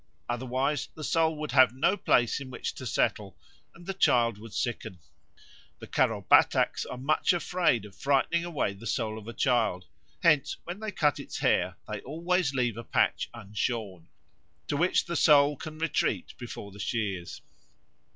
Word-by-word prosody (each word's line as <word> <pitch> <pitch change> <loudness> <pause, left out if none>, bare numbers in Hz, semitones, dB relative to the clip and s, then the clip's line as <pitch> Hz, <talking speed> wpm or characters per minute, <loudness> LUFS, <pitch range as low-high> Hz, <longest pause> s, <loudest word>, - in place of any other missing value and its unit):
Otherwise 130 +3 -1
the 155 - -8
soul 160 0 +2
would 150 0 -4
have 130 -2 +5
no 155 +9 +2
place 120 - +2
in 135 -2 -8
which 130 - -4
to - - -7
settle, - - -1 0.4
and 175 - -14
the 195 - -3
child 120 - +2
would 115 0 -11
sicken. 115 -5 -3 0.8
The - - -10
Karo - - +1
Bataks - - +4
are 125 - -6
much 145 +7 +2
afraid 175 - +1
of 100 - -13
frightening 140 +7 +1
away 165 -12 -2
the 105 +4 -9
soul 110 -2 -2
of 110 - -13
a 115 - -6
child; 115 -9 +1 0.4
hence 155 -5 +3
when 175 +3 -7
they 220 0 -4
cut 145 -5 +1
its 140 - -7
hair, - - +1
they - - -5
always 170 +2 0
leave 125 -4 -1
a 120 - -6
patch - - +1
unshorn, 100 -4 -4 0.6
to - - 0
which 175 +5 +2
the 170 - -4
soul 145 -2 +5
can 155 +3 -8
retreat 165 +1 -1
before 115 -4 -8
the 100 - -13
shears. 100 -5 -3
130 Hz, 170 wpm, -28 LUFS, 115-155 Hz, 0.8 s, have